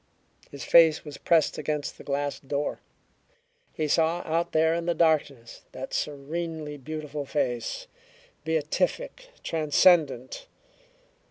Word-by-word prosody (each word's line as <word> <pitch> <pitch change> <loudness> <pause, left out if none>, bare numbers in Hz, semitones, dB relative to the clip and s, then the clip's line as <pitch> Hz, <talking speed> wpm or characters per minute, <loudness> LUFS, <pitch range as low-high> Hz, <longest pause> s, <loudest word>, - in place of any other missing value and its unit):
His 140 -3 -8
face 160 +1 +5
was 150 -2 -9
pressed 165 -3 +2
against 150 -1 -3
the - - -10
glass 145 0 -2
door. 140 +1 -3 0.9
He 155 -2 -2
saw, 165 +3 +2
out 165 +2 -1
there 160 +1 +3
in 170 0 -2
the 170 - +1
darkness, 145 -8 0
that - - -7
serenely 150 +1 -4
beautiful 150 +1 -5
face, 130 - -2 0.6
beatific, 180 - -2
transcendent. 155 - +2
155 Hz, 110 wpm, -27 LUFS, 145-165 Hz, 0.9 s, face